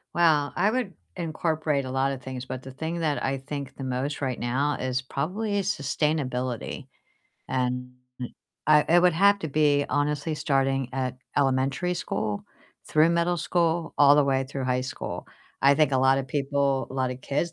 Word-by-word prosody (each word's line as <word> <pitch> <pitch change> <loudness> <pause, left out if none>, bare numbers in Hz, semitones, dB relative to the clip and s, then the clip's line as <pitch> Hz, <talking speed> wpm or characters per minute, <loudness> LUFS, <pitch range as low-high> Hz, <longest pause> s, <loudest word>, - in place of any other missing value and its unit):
Well, 155 -4 +3
I 205 - +3
would 240 -6 -2 0.2
incorporate 155 -4 -1
a 130 - -5
lotta 135 +1 0
things, 130 0 -6
but 130 -1 -5
the 130 - -8
thing 160 +5 -4
that 155 -3 0
I 135 +1 0
think 140 +1 -6
the 135 - -7
most 130 +3 -2
right 130 -3 -2
now 135 +5 0
is 130 0 -1
probably 200 +11 -2
sustainability. 140 - -2 0.6
And 125 -1 -1 0.8
I 150 0 +6
it 175 +2 +6
would 180 - +5
have 200 +4 +5
to 160 - -3
be 145 -1 +3
honestly 145 +2 0
starting 135 -4 +1
at 130 -1 -2 0.2
elementary 135 +5 +1
school 105 - -3 0.4
through 155 +2 +4
middle 170 +1 +1
school 170 0 0
all 145 0 +8
the 145 - +5
way 135 -1 +1
through 135 0 -5
high 125 0 +1
school. 130 - -5 0.4
I 140 +1 +6
think 150 -1 +3
a 130 - +3
lotta 135 +1 +4
people 140 0 0
lotta 130 -1 -1
kids, 145 +6 -2
140 Hz, 165 wpm, -26 LUFS, 130-160 Hz, 0.8 s, all